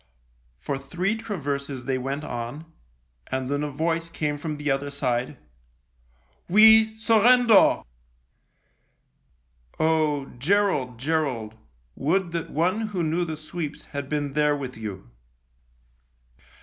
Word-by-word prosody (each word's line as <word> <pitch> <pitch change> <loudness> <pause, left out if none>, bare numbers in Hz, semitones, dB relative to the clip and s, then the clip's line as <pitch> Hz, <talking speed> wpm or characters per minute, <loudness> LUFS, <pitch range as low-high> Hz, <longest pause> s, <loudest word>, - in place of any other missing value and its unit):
For 140 -1 -4
three 175 +10 -2
traverses 140 - -4
they 130 0 -1
went 135 +3 -3
on, 120 +6 -5 0.6
and 130 0 -3
then 145 +1 -1
a 150 - -2
voice 165 +3 -1
came 150 -3 -2
from 150 0 -4
the 145 -1 -1
other 135 +1 -1
side, 130 -1 -2 0.6
" - - -38
We 220 0 +7
surrender." 230 0 +5 2.0
Oh! 155 -3 +2
Gerald, 150 - +1
Gerald, 135 -6 -1 0.4
would 175 +4 0
that 170 -1 -3
one 185 +8 0
who 190 -5 -2
knew 165 +3 0
the 160 -2 -5
sweeps 155 -1 -6
had 140 -1 -4
been 145 -2 -2
there 150 0 +2
with 130 -3 -6
you 100 - -8
150 Hz, 120 wpm, -25 LUFS, 135-170 Hz, 2.0 s, We